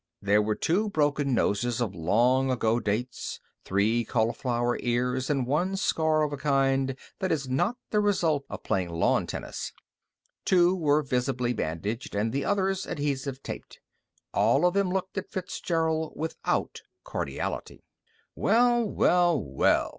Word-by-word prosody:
There 100 +1 +3
were 105 0 0
two 205 +6 +1
broken 145 -5 +1
noses 115 +2 0
of 115 -6 -1
long 120 +10 +2
ago 115 -2 +1
dates, 115 +3 -3 0.2
three 110 +5 +1
cauliflower 120 +2 0
ears, 125 +2 0
and 135 -4 +1
one 175 +9 0
scar 160 -5 +2
of 150 -1 -1
a - - -3
kind 135 -2 +1 0.2
that 190 -2 -1
is 140 -4 -1
not 175 - 0
the 210 - +3
result 170 -8 +2
of - - -7
playing 90 -2 -1
lawn 85 0 +1
tennis. - - -5 0.7
Two 180 0 +4
were 155 -3 +2
visibly 125 -1 0
bandaged, 105 - -3
and 110 +3 0
the 140 - 0
others 195 -1 0
adhesive 140 -2 -3
taped. - - -8 0.5
All 145 +6 +3
of 180 - +3
them 200 -1 +2
looked 190 +1 -2
at 195 - -9
Fitzgerald 165 -4 -1
without 160 +1 -2 0.2
cordiality. - - -4 0.5
"Well, 240 +1 +3
well, 175 -6 +3
well!" 70 -8 +1
135 Hz, 140 wpm, -27 LUFS, 120-175 Hz, 0.7 s, Two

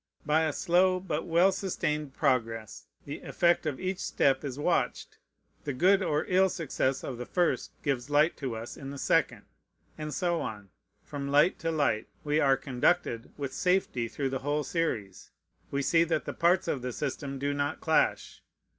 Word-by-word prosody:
By 155 +2 +3
a 155 - 0
slow, 185 +4 +2
but 170 -4 -3
well 175 +3 +4
sustained 150 -7 -2
progress, 115 -6 -1 0.2
the 145 +2 -6
effect 170 -2 +1
of 145 -4 -3
each 185 0 -2
step 135 0 +1
is 135 -2 -5
watched; 145 - -1 0.4
the 145 - -3
good 190 +9 +4
or 150 -4 0
ill 190 +1 +4
success 135 -5 -1
of 125 -3 -5
the 125 - -4
first 175 -2 0
gives 135 -2 -1
light 150 +3 +3
to 130 -5 -4
us 115 +1 -7
in 135 - -7
the 140 - -7
second; - - +1 0.6
and 150 0 -4
so, 150 - -2 0.4
from 140 -1 -5
light 145 +6 +3
to 165 - -2
light, 140 -9 0 0.2
we 150 +1 +1
are 135 -3 +4
conducted 125 -3 0
with 140 -2 -4
safety 180 -11 +1
through 135 +4 -3
the 135 0 -2
whole 145 +3 -1
series. 130 - -3 0.4
We 140 0 -1
see 165 +4 +4
that 160 -2 -1
the - - -4
parts 175 +2 +2
of 130 - -1
the 125 0 -4
system 140 0 -4
do 140 +1 -1
not 145 +1 -2
clash. 160 -1 +1
145 Hz, 175 wpm, -29 LUFS, 135-165 Hz, 0.6 s, well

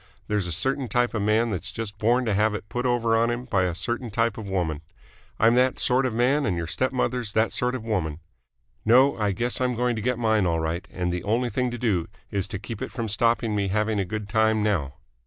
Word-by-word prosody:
There's 105 -3 0
a - - -4
certain 130 - -1
type 120 +2 +1
of 115 - -1
man 110 +3 +2
that's 95 - -3
just 105 -3 -6
born 120 +3 +2
to 110 - +1
have 105 +1 +2
it 105 - -7
put 125 +1 -1
over 115 -2 +2
on 115 +1 +3
him 120 +1 -3
by 95 -7 +1
a 90 -2 -2
certain 120 +5 -3
type 115 +1 0
of 110 -2 -7
woman. 85 -6 -1 0.6
I'm 115 +1 +5
that 130 +1 +3
sort 130 +1 +2
of 125 - -3
man 130 +5 +2
and 90 -9 0
your 85 - -2
stepmother's 125 +2 -1
that 110 +1 +2
sort 125 +1 0
of 125 - -5
woman. 85 -9 -2 0.6
No, 130 +5 +5
I 105 -2 +1
guess 120 +6 0
I'm 125 -1 +1
going 120 0 0
to 110 - -3
get 125 +2 0
mine 110 -5 +2
all 85 -1 +1
right, 80 +2 -3
and 90 -1 -2
the 90 0 -3
only 120 +3 0
thing 125 -1 0
to 120 - -5
do 100 -8 0 0.2
is 100 -2 -1
to - - -5
keep 110 +2 -7
it - - -3
from 115 -3 -4
stopping 115 +1 +1
me 100 -1 0
having 105 +2 0
a - - +2
good 105 +1 -5
time 110 0 +2
now." 80 -11 0
110 Hz, 245 wpm, -25 LUFS, 100-120 Hz, 0.6 s, I'm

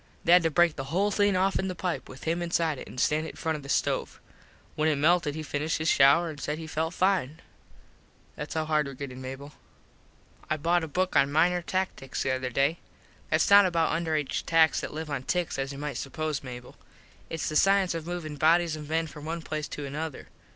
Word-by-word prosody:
They 170 - +2
had 180 +1 +8
to 165 - +1
break 170 0 +3
the 135 - -4
whole 190 +9 0
thing 205 -1 +2
offen 190 0 +1
the 185 - -4
pipe 180 -1 -3
with 130 - -11
him 165 +2 -1
inside 165 -4 0
it - - -9
an - - -11
stand 155 +4 +1
it - - -8
in - - -17
front 160 -1 -2
of 150 - -6
the 140 - -11
stove. - - -1 0.5
When 155 +1 +1
it 155 - +2
melted 150 0 +2
he 155 - -4
finished 150 +1 -2
his 160 +1 0
shouer 140 +5 +5
an 155 -3 -7
said 150 +1 -3
he 160 - -7
felt 160 +2 -2
fine. 180 -6 +1 1.0
Thats 150 +1 -6
how 160 0 0
hard 155 -2 +1
were 135 - -7
gettin, 130 -1 -7
Mable. 135 +3 -8 1.0
I 155 - +1
bought 170 +3 +1
a - - -3
book 185 +5 -1
on 140 +1 +4
Minor 175 +4 +3
Tackticks 185 -7 -3
the 135 - 0
other 130 0 -2
day. 140 +7 +1 0.5
Thats - - +2
not 200 -1 +8
about 165 -2 +1
underaged 160 -4 -2
tacks 165 -1 +4
that - - -5
live 155 0 -6
on 140 -2 -2
ticks 175 +1 -2
as 135 0 -2
you 140 - -8
might 145 0 -4
suppose, 155 +1 -3
Mable. 125 -2 -9 0.5
Its 165 - -3
the 155 - -3
cience 195 +1 +4
of 165 -1 -5
movin 165 -4 -5
bodies 165 +2 +3
of 150 -1 -9
men 165 +1 +1
from 150 -1 -10
one 165 +1 -4
place 155 -1 -4
to 145 - -6
another. 150 +1 -6
155 Hz, 225 wpm, -27 LUFS, 145-170 Hz, 1.0 s, had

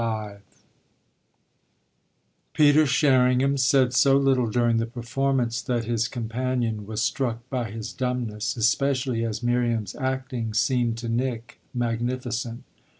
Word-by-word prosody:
XLV 110 -3 -3 2.1
Peter 150 +1 +5
Sherringham 130 -1 +3
said 130 -1 +3
so 135 +1 +5
little 135 -4 +2
during 120 0 +2
the 115 0 0
performance 120 0 -1
that 120 -4 -2
his 115 0 0
companion 120 -3 -2
was 110 +1 -2
struck 120 -3 -2
by 125 -4 -2
his 110 +1 -6
dumbness, 125 -3 -2
especially 130 0 +1
as 115 +1 -3
Miriam's 120 -4 0
acting 130 -4 -3
seemed 120 -1 +1
to 115 0 -5
Nick 120 0 -3
magnificent. 120 0 -3
120 Hz, 115 wpm, -25 LUFS, 115-130 Hz, 2.1 s, Peter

